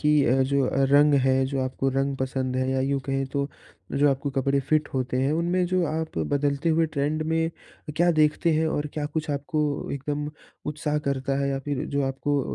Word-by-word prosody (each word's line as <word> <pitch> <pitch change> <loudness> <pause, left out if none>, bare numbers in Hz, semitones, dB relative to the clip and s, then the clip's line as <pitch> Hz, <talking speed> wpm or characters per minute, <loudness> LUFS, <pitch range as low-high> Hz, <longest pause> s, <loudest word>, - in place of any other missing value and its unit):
कि 150 - +3
अ, 130 +3 +3
जो 135 -1 +1 0.2
रंग 145 +1 +6
है, 130 0 +3
जो 135 0 -2
आपको 130 +1 -1
रंग 135 +1 0
पसंद 130 -1 -2
है 130 0 0
या 130 0 +1
यूँ 135 +1 0
कहें 135 0 0
तो 140 0 -1 0.4
जो 145 +1 +4
आपको 140 +1 -2
कपड़े 135 0 +1
फिट 150 +2 +1
होते 130 -1 -1
हैं, 135 +2 +2
उनमें 175 +3 +1
जो 180 0 +1
आप 160 - -3
बदलते 140 - 0
हुए 165 0 +3
ट्रेंड 155 +1 -1
में 160 +1 +1
अ, 155 -2 -13
क्या 175 +2 +4
देखते 155 +2 +3
हैं? 160 +1 +2
और 150 -1 -1
क्या 150 -1 -2
कुछ 155 0 -3
आपको 145 0 -1
एकदम 145 +2 -3 0.4
उत्साह 150 0 -1
करता 135 0 -1
है 140 - 0
या 135 0 -1
फिर 145 -2 -2
जो 140 0 -1
आपको 140 +2 0
140 Hz, 205 wpm, -25 LUFS, 135-155 Hz, 0.4 s, रंग